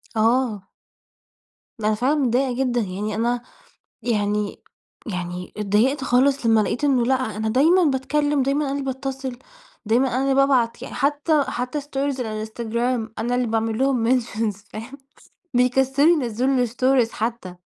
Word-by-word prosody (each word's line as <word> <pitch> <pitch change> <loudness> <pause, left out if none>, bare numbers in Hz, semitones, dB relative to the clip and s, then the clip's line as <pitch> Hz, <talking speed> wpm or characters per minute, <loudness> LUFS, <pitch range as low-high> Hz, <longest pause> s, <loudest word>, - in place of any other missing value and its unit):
آه. 225 -3 +1 1.1
أنا 215 0 +1
فعلًا 255 +7 +1
متضايقة 260 -2 +1
جدًا، 245 -2 0
يعني 205 +2 -3
أنا 235 +2 0 0.6
يعني 210 -2 -1 0.4
يعني 180 -2 -5
اتضايقت 215 +7 +1
خالص 265 +1 +2
لما 225 -1 +5
لقيت 245 - -2
إنه 265 -4 +3
لأ 265 - +3 0.2
أنا 220 0 -1
دايمًا 320 +10 +4
باتكلّم 290 0 +1
دايمًا 280 +2 0
أنا 270 - -2
اللي 280 0 -2
باتّصل، 265 -1 -4 0.5
دايمًا 235 +5 +3
أنا 255 +1 -1
اللي 275 -1 +2
بابعت 265 -4 +2
يعني - - -7
حتى 290 +2 +2
حتى 250 +4 -3
stories 275 -1 -3
الإنستجرام 225 +1 -3
أنا 240 +2 0
اللي 250 -1 0
باعمل 225 0 -1
لهم 260 -4 +2
mentions 220 -3 -3 0.2
فاهم، 235 +6 -8 0.6
بيكسّلوا 265 +4 +3
ينزِّلوا 250 +2 +1
الstories 250 0 +1
حتى. 220 -5 -4
245 Hz, 140 wpm, -22 LUFS, 220-270 Hz, 1.1 s, لما